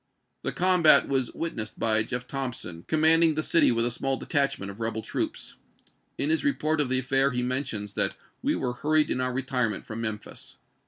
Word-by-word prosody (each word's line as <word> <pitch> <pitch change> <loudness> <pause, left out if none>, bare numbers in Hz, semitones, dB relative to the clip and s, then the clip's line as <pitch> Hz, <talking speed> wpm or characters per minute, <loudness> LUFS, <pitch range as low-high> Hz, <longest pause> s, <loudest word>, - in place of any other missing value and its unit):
The - - -3
chap.xix. - - -8
combat 180 -3 +6
was 135 -3 0
witnessed 115 -10 -4
by 110 -1 +2
Jeff. 125 +3 -2
Thompson, 125 -11 -5
com 155 -1 0
manding 160 0 +5
the 155 - -1
city 165 - +4
with 115 0 +2
a 120 - +2
small 135 +3 -1
detachment 135 -10 -1
of 100 - -14
rebel 110 -1 -3
troops. - - -4 0.6
In 145 +3 0
his 160 - +1
report 155 - +1
of 135 - 0
the 130 - +2
affair 135 +1 +2
he 125 -2 -2
mentions 125 -6 -3
that - - -1 0.3
"we - - 0
were 125 - -2
hurried 155 +4 +1
in 130 - 0
our 130 0 -1
retirement 125 -5 -2
from 115 +1 -6
Mem 110 -2 -2
phis." 105 - -11
130 Hz, 205 wpm, -26 LUFS, 115-150 Hz, 0.6 s, combat